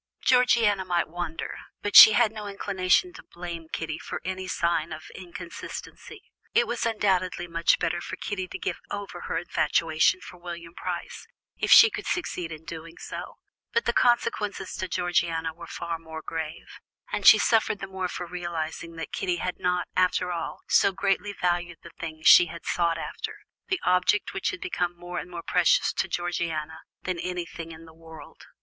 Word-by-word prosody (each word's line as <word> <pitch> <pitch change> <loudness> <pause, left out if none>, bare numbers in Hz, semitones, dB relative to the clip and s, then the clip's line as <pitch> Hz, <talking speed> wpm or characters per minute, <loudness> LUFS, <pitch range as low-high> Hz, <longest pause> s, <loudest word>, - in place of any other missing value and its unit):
Georgiana 235 -6 +4
might 175 -2 0
wonder, 170 -1 -5 0.2
but 205 - -2
she 215 - +12
had 235 -2 +4
no 215 -2 -7
inclination 200 - +1
to - - -11
blame 170 -2 -8
Kitty 160 -1 -4
for - - -5
any 185 0 -4
sign 170 -2 0
of 155 0 -8
inconsistency. 175 -1 -9 0.3
It 470 - +5
was - - -1
undoubtedly 190 -5 0
much 165 0 +2
better 175 +1 -1
for - - -6
Kitty 190 -2 -4
to - - -6
get - - -3
over 200 -3 -6
her - - -1
infatuation 160 +1 +2
for 180 - -11
William 170 -1 -8
Price, - - -6 0.3
if - - -2
she 445 - +10
could 405 0 -6
succeed 180 - -2
in 155 0 -9
doing 165 0 -8
so; - - -7 0.4
but 235 - +1
the 235 - +1
consequences 215 -6 +1
to 185 - -3
Georgiana 170 -2 0
were 170 +1 -11
far 170 -1 -4
more 160 -1 -9
grave, 160 -1 -6 0.3
and - - -1
she - - +11
suffered 220 -2 +2
the 195 - -6
more 190 -1 -3
for 180 - -5
realizing 170 -1 -5
that 165 - -7
Kitty 180 -2 0
had 180 +1 -4
not, 180 0 0
after 180 0 +2
all, 170 -2 -4
so 200 - +4
greatly 195 +1 0
valued 175 -2 -1
the 170 - -11
thing 155 -1 -6
she 175 - +8
had 170 +1 -10
sought 170 -1 +1
after, 440 - -5 0.3
the 375 -2 0
object 180 +3 +2
which 190 - -1
had - - -6
become 175 -1 -2
more 175 0 -5
and - - -8
more 170 -1 -7
precious 180 -1 +3
to - - -1
Georgiana 165 -3 -3 0.2
than 180 -2 -2
anything 170 -2 -5
in 165 0 -11
the 160 - -15
world. 160 -2 -13
175 Hz, 180 wpm, -26 LUFS, 165-190 Hz, 0.4 s, she